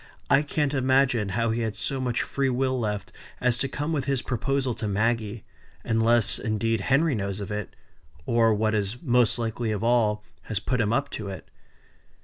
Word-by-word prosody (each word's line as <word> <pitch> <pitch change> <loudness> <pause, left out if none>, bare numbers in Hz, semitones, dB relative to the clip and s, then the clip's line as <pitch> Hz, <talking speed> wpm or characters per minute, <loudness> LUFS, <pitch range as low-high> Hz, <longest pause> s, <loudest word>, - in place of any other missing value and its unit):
I 135 - +6
can't 150 -1 -1
imagine 130 -5 +2
how 115 -1 +1
he 115 +1 -1
had 110 -2 -2
so 135 +5 -1
much 125 -2 0
free 140 -1 -1
will 130 0 0
left 105 -3 -3 0.3
as 125 -1 +2
to 135 - 0
come 145 +4 -3
with 140 -4 -1
his 135 -2 0
proposal 130 +1 -1
to 110 - -4
Maggie; 110 +1 -1 0.4
unless, 115 0 +3
indeed, 110 -1 0
Henry 140 +8 +2
knows 100 -3 -3
of 100 0 -6
it 105 -2 -5 0.5
or, 115 -1 +3
what 110 +1 +1
is 105 +2 -1
most 125 -5 +3
likely 115 0 -2
of 105 0 -2
all, 110 -3 +2 0.2
has 110 -3 -2
put 125 +4 0
him 105 -1 +1
up 140 +4 0
to 105 - -5
it. 95 - -9
115 Hz, 185 wpm, -26 LUFS, 105-130 Hz, 0.5 s, I